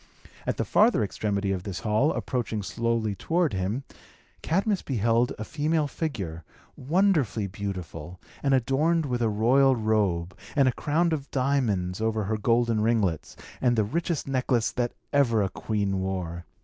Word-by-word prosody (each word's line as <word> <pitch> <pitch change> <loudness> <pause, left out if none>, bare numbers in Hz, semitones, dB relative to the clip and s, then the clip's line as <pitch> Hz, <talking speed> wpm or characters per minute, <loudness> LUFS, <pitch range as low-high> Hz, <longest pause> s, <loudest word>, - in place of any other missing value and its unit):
At - - 0
the - - -1
farther 215 - +4
extremity 100 -1 -1
of 95 -2 -1
this 95 -1 -5
hall, 115 +7 +2
approaching 115 -4 -2
slowly 115 0 -1
toward 165 - 0
him, 100 +8 -2 0.6
Cadmus 195 +4 +1
beheld 120 -1 +1
a 110 - -4
female 155 +5 0
figure, 100 - -4 0.3
wonderfully 150 - +1
beautiful, 90 -4 -6 0.2
and 140 -1 +3
adorned 150 +6 +2
with 125 -3 -2
a 115 - +2
royal 130 +6 +4
robe, 100 -6 0 0.2
and 140 -3 +4
a - - +4
crown 165 +5 +1
of 145 -3 -4
diamonds 115 -9 0
over 110 -1 0
her 110 +2 -1
golden 115 0 +2
ringlets, 105 -8 0 0.3
and 120 -2 +3
the 110 - +3
richest 165 - -2
necklace 125 -4 +1
that 120 -1 -1 0.2
ever 120 -7 +3
a 95 - -1
queen 100 -1 -2
wore. 90 -2 -3
115 Hz, 150 wpm, -26 LUFS, 100-140 Hz, 0.6 s, farther